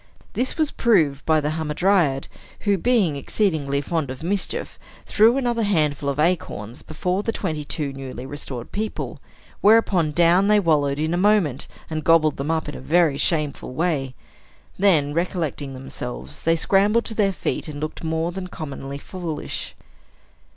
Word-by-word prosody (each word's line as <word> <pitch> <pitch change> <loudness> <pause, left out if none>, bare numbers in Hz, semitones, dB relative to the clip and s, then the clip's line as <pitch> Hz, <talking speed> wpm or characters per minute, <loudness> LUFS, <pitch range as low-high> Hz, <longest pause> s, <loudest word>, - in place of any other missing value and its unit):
This 250 +5 -1
was 310 -2 +1
proved 160 - +2
by 160 -1 +4
the 150 0 -1
hamadryad, 155 -2 +1 0.3
who, 205 -1 +2
being 200 - +2
exceedingly 140 -3 0
fond 155 -1 -2
of 130 +3 -7
mischief, 195 +2 -2 0.3
threw 225 +4 +4
another 240 -3 0
handful 150 -9 +1
of 140 - -2
acorns 150 - -1
before 180 +5 -2
the 225 - -1
twenty 160 -9 -3
two 145 -1 -3
newly 130 -2 -7
restored 135 -4 -6
people; 215 +1 -4 0.4
whereupon 200 -7 +4
down 175 +4 +4
they 210 0 +5
wallowed 145 -6 +2
in 155 +2 0
a - - +1
moment, 185 -9 +2 0.2
and 155 -1 -4
gobbled 155 -2 +4
them 140 +3 -3
up 160 -1 0
in 150 - -5
a - - -8
very 150 0 +2
shameful 150 -5 -1
way. 145 -6 -1 0.6
Then, 160 -8 +3
recollecting 160 -5 -2
themselves, 65 - -6
they 165 0 +3
scrambled 205 +7 +3
to - - -4
their 205 -3 +2
feet, 185 - -3
and 145 -2 -6
looked 155 +2 -5
more 160 +1 -1
than 185 0 -5
commonly 140 -5 -6
foolish. 165 0 -6
160 Hz, 160 wpm, -23 LUFS, 145-195 Hz, 0.6 s, they